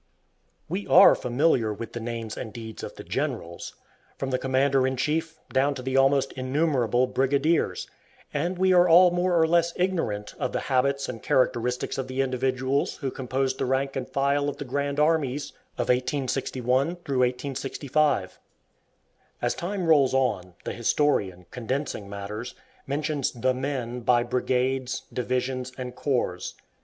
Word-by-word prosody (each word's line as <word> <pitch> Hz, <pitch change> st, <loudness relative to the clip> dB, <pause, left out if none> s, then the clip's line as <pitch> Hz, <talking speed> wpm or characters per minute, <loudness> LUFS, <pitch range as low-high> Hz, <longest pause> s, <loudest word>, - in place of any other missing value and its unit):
We 190 Hz, +5 st, -4 dB
are 195 Hz, -, +8 dB
familiar 125 Hz, -3 st, +1 dB
with 110 Hz, +2 st, -7 dB
the 120 Hz, -, -4 dB
names 115 Hz, -1 st, -5 dB
and 110 Hz, -, -6 dB
deeds 110 Hz, -1 st, -8 dB
of -, -, -7 dB
the -, -, -9 dB
"generals," 85 Hz, +1 st, -4 dB, 0.4 s
from 135 Hz, -1 st, -3 dB
the 130 Hz, -, +1 dB
commander 135 Hz, 0 st, +2 dB
in 130 Hz, 0 st, -2 dB
chief 160 Hz, +4 st, -1 dB, 0.2 s
down 140 Hz, +2 st, +2 dB
to 130 Hz, -, -7 dB
the 130 Hz, +1 st, -2 dB
almost 135 Hz, 0 st, +3 dB
innumerable 130 Hz, -2 st, +1 dB
brigadiers, 140 Hz, +5 st, +1 dB, 0.5 s
and 170 Hz, +5 st, -1 dB
we 185 Hz, 0 st, +3 dB
are 180 Hz, 0 st, +6 dB
all 175 Hz, +2 st, +7 dB
more 175 Hz, 0 st, +2 dB
or 160 Hz, -, +5 dB
less 170 Hz, 0 st, +2 dB
ignorant 165 Hz, -, -1 dB
of 125 Hz, -, -2 dB
the -, -, -1 dB
habits 140 Hz, +2 st, +2 dB
and 115 Hz, -, -6 dB
characteristics 125 Hz, 0 st, 0 dB
of 130 Hz, -, -3 dB
the 130 Hz, +1 st, -1 dB
individuals 130 Hz, +1 st, 0 dB
who 135 Hz, -2 st, -4 dB
composed 130 Hz, +1 st, -2 dB
the -, -, 0 dB
rank 135 Hz, +1 st, 0 dB
and 130 Hz, -2 st, -4 dB
file 140 Hz, +1 st, +1 dB
of 145 Hz, -, -6 dB
the 145 Hz, -, -6 dB
"grand 140 Hz, +2 st, -2 dB
armies" 150 Hz, -3 st, +1 dB, 0.3 s
of 120 Hz, -, -2 dB
1861 130 Hz, +3 st, 0 dB, 0.6 s
65. 140 Hz, -5 st, 0 dB, 1.0 s
As -, -, 0 dB
time 185 Hz, +1 st, -3 dB
rolls 145 Hz, -5 st, +4 dB
on, 95 Hz, -9 st, 0 dB
the -, -, -4 dB
historian, 105 Hz, -8 st, 0 dB
condensing 125 Hz, -4 st, -3 dB
matters, 105 Hz, +4 st, -6 dB, 0.3 s
mentions 145 Hz, -1 st, -1 dB
"the 130 Hz, +2 st, +1 dB
men" 125 Hz, -2 st, -3 dB
by 120 Hz, 0 st, +3 dB
brigades, 125 Hz, +1 st, -1 dB
divisions, 125 Hz, +1 st, -2 dB
and 125 Hz, -1 st, -5 dB
corps. 120 Hz, -10 st, -1 dB
130 Hz, 150 wpm, -26 LUFS, 125-145 Hz, 1.0 s, are